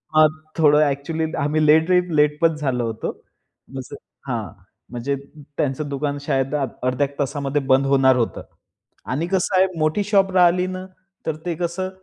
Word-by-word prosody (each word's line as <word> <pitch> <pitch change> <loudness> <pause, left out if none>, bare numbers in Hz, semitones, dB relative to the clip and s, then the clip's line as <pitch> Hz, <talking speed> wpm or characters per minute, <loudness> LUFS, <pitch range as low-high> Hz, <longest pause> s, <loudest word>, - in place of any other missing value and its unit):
हां, 155 0 +7 0.3
थोडं 150 -2 +5
एक्चुअली 140 +4 -3 0.2
आम्ही 150 +2 +1
लेट 160 +3 +5
रेट 180 0 +3
लेट 150 0 +3
पण 165 -1 +3
झालो 130 -5 -1
होतो. 115 -1 -3 0.6
म्हणजे 130 -1 -7 0.4
हां, 115 -4 -2 0.5
म्हणजे 125 +3 -2
अ, - - -1 0.4
त्यांचं 145 +1 -1
दुकान 140 +1 -2
शायद 135 +1 -1
आ 140 -2 +1 0.2
अर्ध्या 130 +3 +1
1 140 0 -20
तासामध्ये 140 0 -1
बंद 135 +1 +4
होणार 135 -1 +4
होतं. 115 -3 -1 0.6
आणि 150 +7 -2
कसं 190 0 0
आहे, 185 - +6
मोठी 155 +6 +1
शॉप 195 -2 +2
राहिली 180 0 +4
ना, 185 0 -5 0.4
तर 160 - -1
ते 175 -2 -1
कसं 175 +2 -3
150 Hz, 170 wpm, -21 LUFS, 135-170 Hz, 0.6 s, हां